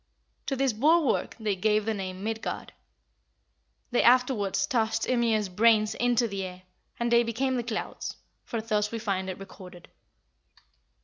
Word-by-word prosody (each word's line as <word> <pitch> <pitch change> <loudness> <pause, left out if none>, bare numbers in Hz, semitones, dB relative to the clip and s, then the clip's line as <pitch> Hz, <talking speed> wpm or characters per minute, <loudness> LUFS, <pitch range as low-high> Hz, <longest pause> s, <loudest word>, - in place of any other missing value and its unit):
To 270 - 0
this 265 -2 +1
bulwark 300 +6 +2
they 215 -3 0
gave 210 +2 +1
the 220 - 0
name 190 -2 -5
of 190 - -9
Midgard 220 +1 -4 1.2
They 240 - +3
afterwards 240 -6 +3
tossed 225 0 0
Ymir's 230 -4 +1
brains 215 +3 +3
into 240 0 +2
the 195 -2 -4
air, 185 0 -8 0.4
and 235 0 0
they 235 0 +6
became 245 +3 -1
the 245 - 0
clouds, 230 -2 -4 0.3
for 230 - -4
thus 210 -2 0
we 230 - -3
find 195 -4 -2
it 185 - -5
recorded. 180 -2 -12
220 Hz, 150 wpm, -27 LUFS, 195-240 Hz, 1.2 s, they